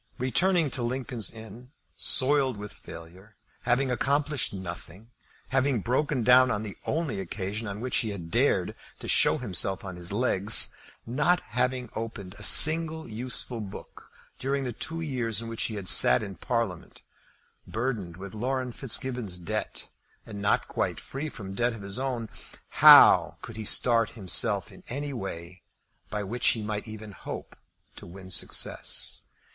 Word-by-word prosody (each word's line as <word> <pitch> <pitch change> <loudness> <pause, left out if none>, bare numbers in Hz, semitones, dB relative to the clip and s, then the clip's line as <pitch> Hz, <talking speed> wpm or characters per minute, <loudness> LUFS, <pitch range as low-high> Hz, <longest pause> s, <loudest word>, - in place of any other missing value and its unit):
Returning 165 +4 +1
to 125 - -1
Lincoln's 120 -3 -3
Inn 115 +4 -12 0.2
soiled 135 -3 +2
with 105 0 -8
failure, 90 +6 -13 0.3
having 125 +2 +1
accomplished 140 +3 0
nothing, 95 +3 -9 0.4
having 130 -3 +1
broken 130 +3 -1
down 125 +2 +6
on 105 - -2
the 105 -3 -7
only 155 -9 -2
occasion 100 +4 -5
on 100 +1 -6
which 125 +1 -1
he 110 - -1
had 85 -5 -7
dared 115 -7 +1 0.2
to - - -9
show - - +3
himself 95 -6 -2
on 95 -2 -7
his 90 +1 -3
legs, 105 -2 +4 0.3
not 150 +9 +1
having 125 +1 -2
opened 110 -4 -6
a - - -12
single 160 0 +7
useful 120 +1 -4
book 100 -2 -11 0.3
during 135 +1 -2
the 125 -2 -4
two 165 +8 -4
years 120 - -3
in 115 - -5
which 115 - -2
he 110 - -4
had 100 -3 -6
sat 60 -6 +4
in 100 - -6
Parliament, 115 -4 -4 0.6
burdened 110 -8 -4
with 95 0 -9
Laurence 125 +2 -3
Fitzgibbon's 120 -6 -1
debt, 85 -2 -5 0.4
and 100 -2 -8
not 100 - +1
quite - - -3
free 145 +3 -6
from 100 -7 -9
debt 120 +3 0
of 110 -3 -10
his 100 +4 -4
own, 125 -4 -3 0.4
how - - +7
could 115 - -9
he 110 - -6
start 115 +1 +2
himself 95 -6 +1
in - - -15
any 140 +3 -4
way 90 -5 -7 0.5
by 105 -1 -3
which 115 +5 -1
he 110 - +2
might 105 +1 -4
even 110 -1 -9
hope - - -9 0.4
to - - -12
win 95 +1 -11
success? - - -2
115 Hz, 155 wpm, -27 LUFS, 100-130 Hz, 0.6 s, single